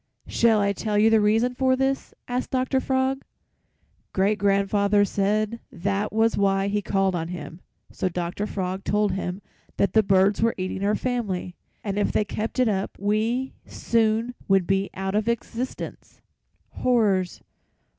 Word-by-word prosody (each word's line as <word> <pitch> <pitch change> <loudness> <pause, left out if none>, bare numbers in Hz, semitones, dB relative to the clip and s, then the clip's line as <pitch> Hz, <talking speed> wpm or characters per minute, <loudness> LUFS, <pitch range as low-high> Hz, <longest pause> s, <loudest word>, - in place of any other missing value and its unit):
"'Shall 225 -2 +3
I 200 0 +2
tell 210 +1 -2
you 220 +2 +5
the 220 -1 +5
reason 225 +4 +2
for 260 +1 +2
this?' 270 +1 -1 0.2
asked 250 +1 -2
Dr. 260 +1 +1
Frog. 265 +1 0 0.9
"Great 200 +2 +2
grandfather 200 +1 +3
said 210 +3 0
that 200 +3 -2
was 225 +1 +2
why 195 0 +2
he 205 +1 0
called 195 -1 +1
on 165 -2 -2
him, 170 0 -8 0.3
so 185 - -1
Dr. 175 +4 -3
Frog 190 -1 -3
told 210 -1 +1
him 185 +1 -4 0.3
that 200 -2 +1
the 220 - +6
birds 195 0 +3
were 230 0 +2
eating 185 +1 -3
our 205 +1 +2
family, 205 -8 -2 0.3
and 200 -1 -2
if 205 - +1
they 210 - +1
kept 215 +4 -4
it 255 -1 +3
up 195 -2 -2
we 220 +6 0
soon 225 +1 0
would 195 -2 +3
be 195 +2 0
out 190 0 -3
of 210 +1 0
existence. 235 +2 -5 0.6
"'Horrors! 205 -8 +1
205 Hz, 155 wpm, -24 LUFS, 195-230 Hz, 0.9 s, the